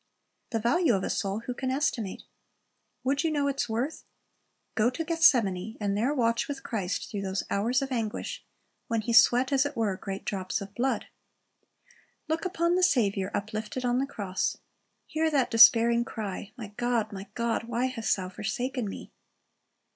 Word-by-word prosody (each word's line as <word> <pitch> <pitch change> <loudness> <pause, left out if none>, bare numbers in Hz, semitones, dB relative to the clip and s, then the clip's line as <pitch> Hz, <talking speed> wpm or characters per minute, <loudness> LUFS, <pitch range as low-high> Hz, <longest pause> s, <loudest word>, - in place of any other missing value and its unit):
The 230 - -1
value 240 - +3
of 190 - -1
a - - -1
soul, 200 +2 -2
who 250 - -4
can 260 +1 -3
estimate? 255 -7 -1 0.8
Would 275 +4 +1
you 325 - +2
know 290 -2 0
its 275 -3 -1
worth, 245 +8 -2 0.7
go 220 +2 +3
to 325 +6 -4
Gethsemane, 225 - +3
and 200 -2 0
there 235 +7 +1
watch 235 -5 +1
with 285 -1 -5
Christ 200 -6 -3
through 205 -3 -3
those 190 0 -2
hours 240 +7 +1
of 270 - -5
anguish, 225 -4 -3 0.4
when 230 -1 0
He 235 +2 -2
sweat 245 +3 +6
as 270 -1 +4
it 285 -2 -4
were 215 -4 +1
great 195 0 -6
drops 185 -2 -2
of 200 0 -8
blood. 260 +5 0 1.2
Look 320 +3 -1
upon 345 -2 +1
the 365 - +2
Saviour 200 - +2
uplifted 215 +4 -3
on 245 +1 +2
the 275 - 0
cross. 195 -8 -2 0.5
Hear 320 0 0
that 275 -5 +1
despairing 230 +1 +7
cry, 205 -3 -6
"My 220 -4 -7
God, 240 -3 0
My 195 0 -7
God, 235 -1 -1
why 235 +2 -1
hast 255 -4 0
thou 185 -2 -5
forsaken 220 +4 -3
Me?" - - -8
235 Hz, 170 wpm, -28 LUFS, 205-265 Hz, 1.2 s, despairing